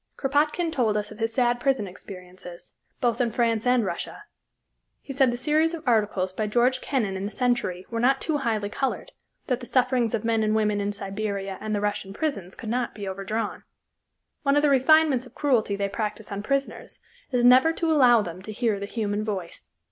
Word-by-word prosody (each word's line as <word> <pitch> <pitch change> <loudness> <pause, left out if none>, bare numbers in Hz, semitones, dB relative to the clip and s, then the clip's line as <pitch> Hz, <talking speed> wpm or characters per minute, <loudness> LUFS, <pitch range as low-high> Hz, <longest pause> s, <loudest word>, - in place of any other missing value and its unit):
Krapotkine 300 +5 +1
told 230 -8 +1
us 210 - -3
of - - -11
his 225 0 0
sad 240 0 +1
prison 260 -4 +1
experiences, 180 -2 -11 0.3
both 240 0 +1
in 240 - +2
France 230 0 0
and 250 -3 +3
Russia. 185 - -5 0.8
He 275 - -8
said 265 -1 +4
the 240 - -2
series 310 +5 +1
of 320 -4 -11
articles 205 -5 +1
by 215 +2 -2
George 245 +4 +2
Kennan 225 -9 -1
in 190 +1 -3
the 205 - -4
Century 240 -7 -1
were 230 - -2
not 265 +3 +3
too 310 -2 -1
highly 225 -6 -1
colored, 265 +6 -3 0.3
that 250 -2 -1
the 245 - -8
sufferings 250 -3 +2
of 225 0 -4
men 225 -1 +2
and 215 0 +1
women 210 -1 +1
in 200 0 -1
Siberia 200 -1 -4
and 215 -1 -2
the 205 - -1
Russian 205 -1 -2
prisons 200 - -3
could 230 - -9
not 245 +1 -1
be 205 -2 -6
overdrawn. 195 +3 -3 0.8
One 280 -1 +2
of 290 - +3
the 295 - +4
refinements 275 -1 +4
of - - -20
cruelty 240 -8 +1
they 200 0 -1
practice 210 +1 -4
on 200 0 -3
prisoners 275 +5 -3 0.3
is 245 -1 +2
never 255 +6 +7
to 330 0 0
allow 245 -7 +5
them 180 0 -7
to 215 - -8
hear 215 -2 0
the 200 - -5
human 210 -1 -2
voice. 185 - -5
230 Hz, 200 wpm, -25 LUFS, 205-260 Hz, 0.8 s, never